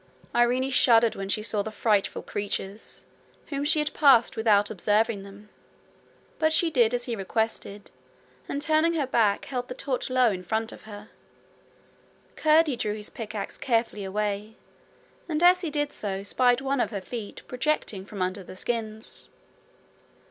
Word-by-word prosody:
Irene 250 +3 +2
shuddered 230 -3 +5
when 195 0 -5
she 210 +1 +1
saw 215 -2 0
the 210 - -4
frightful 215 -2 0
creatures, 200 0 -4 0.4
whom 280 -1 -2
she 300 +2 +2
had 300 0 0
passed 265 -6 +5
without 210 -2 +3
observing 210 +1 +1
them, 200 +1 -13 0.9
but 315 0 +3
she 325 +1 +3
did 245 -4 +3
as 245 - -2
he 240 -2 -3
requested, 210 0 -3 0.6
and 285 +1 -2
turning 315 +2 +3
her 295 -4 +1
back, 225 -6 +2
held 250 -2 -4
the 250 - -6
torch 260 -1 -2
low 255 -3 +4
in 185 -2 -5
front 220 +4 -2
of - - -13
her. 210 0 -10 1.3
Curdie 310 -3 +3
drew 210 -2 -1
his 210 -1 -7
pickaxe 215 -4 -6
carefully 230 -4 0
away, 210 +2 -3 0.7
and 315 +1 0
as 360 +1 +6
he 340 - -2
did 290 -1 -2
so 195 -2 -3
spied 245 +4 +2
one 270 0 -1
of - - +1
her 205 - -4
feet, 215 +1 -7
projecting 250 -6 -1
from 195 -1 -4
under 185 +2 -3
the 185 - -11
skins. 220 +1 -4
225 Hz, 160 wpm, -26 LUFS, 205-265 Hz, 1.3 s, as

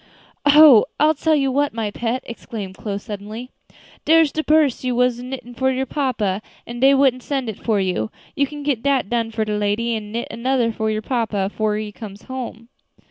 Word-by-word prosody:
"Oh! 290 -6 +8
I'll 305 +1 +5
tell 315 +1 +1
you 275 -2 +1
what, 285 -1 0
my 220 -2 -2
pet," 235 +4 -2
exclaimed 225 -4 -7
Chloe 200 -1 -4
suddenly, 215 +4 -7 0.5
"dere's 320 -2 +4
de 315 - -2
purse 305 -5 +3
you 250 -1 -1
was 250 -1 +2
aknittin' 250 -1 -7
for 265 +1 +1
your 260 +1 -1
papa, 230 -10 -1 0.2
an' 240 0 -7
dey 270 +2 +6
wouldn't 265 -2 +3
send 265 -3 -2
it 215 - -8
for 220 -3 +1
you; 180 - -1 0.3
you 280 0 +1
can 295 +1 -8
get 280 -6 0
dat 270 -6 0
done 230 -1 0
for 220 -1 -2
de 210 0 -2
lady, 210 +3 0
and 210 -1 -6
knit 235 +2 -3
another 235 0 0
for 220 -1 -2
your 215 0 -2
papa, 215 -5 -1
'fore 215 -1 0
he 215 -1 -4
comes 205 -1 -10
home." 245 -3 -7
235 Hz, 200 wpm, -21 LUFS, 215-270 Hz, 0.5 s, Oh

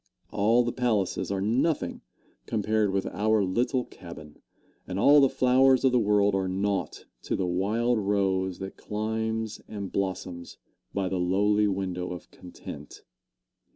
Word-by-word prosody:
All 115 +4 +3
the 120 - -1
palaces 110 -7 0
are 95 -1 -1
nothing 130 +10 0 0.5
compared 110 -1 +1
with 95 0 -1
our 105 +2 +1
little 120 +6 0
cabin, 80 -4 -12 0.5
and 95 - -4
all 145 +8 +6
the 135 - +5
flowers 130 +1 +4
of 130 - +4
the 125 - +3
world 105 -2 +3
are 95 -1 0
naught 100 +2 -2 0.2
to - - -2
the 95 - -1
wild 110 +7 +1
rose 95 -2 0
that 95 0 -7
climbs 110 +1 -3
and 100 -3 -6
blossoms 90 -3 -4 0.3
by 100 -1 -1
the 95 0 -2
lowly 105 +4 +2
window 95 -2 -3
of 90 - -10
content. 90 -1 -11
100 Hz, 145 wpm, -27 LUFS, 95-110 Hz, 0.5 s, all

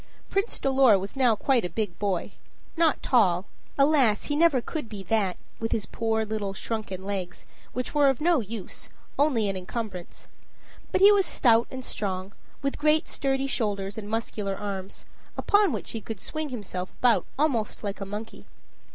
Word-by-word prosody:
Prince 395 +3 0
Dolor 265 -6 +5
was 195 +5 -5
now 250 -4 +4
quite 250 +2 +2
a 180 - -2
big 185 -1 -3
boy. 195 -4 -1 0.4
Not 325 -3 +2
tall 190 -7 +3 0.3
alas! 275 -7 +4
he 290 - -2
never 315 -4 +4
could 295 0 -5
be 205 -3 -7
that, 195 -2 0 0.2
with 225 0 -2
his 215 - 0
poor 220 -1 -1
little 205 -2 -3
shrunken 200 -4 -4
legs, 190 -3 -4 0.3
which 250 0 -3
were 290 -2 +5
of 270 - 0
no 335 0 +3
use, 215 -3 -6 0.3
only 265 -8 +3
an 195 - -1
encumbrance. 185 -1 -6 0.6
But 375 - +1
he 400 +1 +9
was 400 -3 +4
stout 230 -2 +4
and 260 -1 -6
strong, 190 -1 -3 0.3
with 275 - -1
great 305 +2 +3
sturdy 270 0 -1
shoulders, 205 -7 -2
and 210 -2 -6
muscular 215 -3 -2
arms, 195 -1 -6 0.3
upon 410 -1 +4
which - - -4
he 225 - -4
could 220 -1 -6
swing 310 +6 -4
himself 190 -6 -5
about 245 -2 +3
almost 265 -8 0
like 200 0 -4
a - - -1
monkey. 210 +3 -7
225 Hz, 170 wpm, -27 LUFS, 200-275 Hz, 0.6 s, he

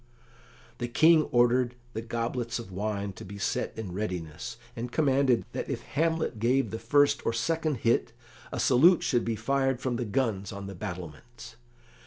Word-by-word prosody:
The 120 - -2
King 155 +5 +5
ordered 120 0 +2 0.2
the 110 - -3
goblets 115 +1 -2
of 115 -5 -8
wine 100 +1 -3
to - - -10
be 100 +2 -8
set 100 - -1
in 110 -5 -5
readiness, 95 +3 -4 0.2
and 120 +1 -5
commanded 135 -5 +2
that - - -4
if - - -3
Hamlet 160 -6 -1
gave 130 +4 +2
the 110 - -4
first 145 +5 +3
or 115 - 0
second 160 +5 0
hit 115 +1 +2 0.4
a - - -3
salute 160 +7 +5
should 120 -3 +1
be 115 -1 -1
fired 135 +3 0
from 125 -2 -2
the 120 - -2
guns 105 -4 -1
on 100 0 -7
the 100 - -6
battlements. 90 +7 -8
120 Hz, 170 wpm, -28 LUFS, 105-135 Hz, 0.4 s, King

